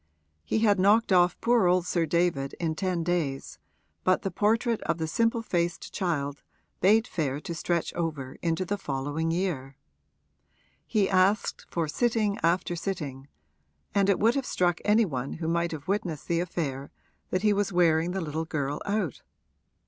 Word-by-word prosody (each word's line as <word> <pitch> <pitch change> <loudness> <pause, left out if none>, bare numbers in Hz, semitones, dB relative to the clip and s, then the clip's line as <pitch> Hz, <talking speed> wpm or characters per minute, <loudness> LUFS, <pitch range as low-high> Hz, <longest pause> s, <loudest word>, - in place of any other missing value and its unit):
He - - -1
had 205 -3 +4
knocked 205 +3 +4
off 180 -1 +4
poor 235 -5 +4
old 180 0 +3
Sir 170 -2 0
David 165 -5 0
in 165 -2 0
ten 180 0 -1
days, 160 -6 -2 0.4
but 185 0 +2
the 195 - -2
portrait 225 +2 +1
of 170 - -1
the 160 - -2
simple 230 +6 +1
faced 170 -4 -2
child 145 -6 -2 0.4
bade 215 +4 +4
fair 145 -5 -2
to 170 - -5
stretch 170 0 -1
over 155 -6 -3
into 170 +2 0
the 205 +3 -2
following 145 +1 -2
year. 165 -7 -2 1.1
He 205 -3 +2
asked 190 +2 +1
for 165 -2 -1
sitting 215 +3 0
after 175 +1 +1
sitting, 150 -7 -4 0.7
and 200 -1 +3
it 200 - +4
would 225 +2 +3
have 275 -2 -2
struck 175 -2 +1
any 215 +2 +4
one 135 -6 -4
who 160 -1 -4
might 170 +1 0
have 155 -2 -7
witnessed 185 -6 -2
the 170 -1 +1
affair 150 -6 -3 0.4
that 185 +2 -1
he 210 -1 +4
was 200 -1 0
wearing 170 -2 +3
the 190 +1 -2
little 160 0 -3
girl 145 -2 -3
out. 200 - -1
175 Hz, 165 wpm, -27 LUFS, 160-200 Hz, 1.1 s, had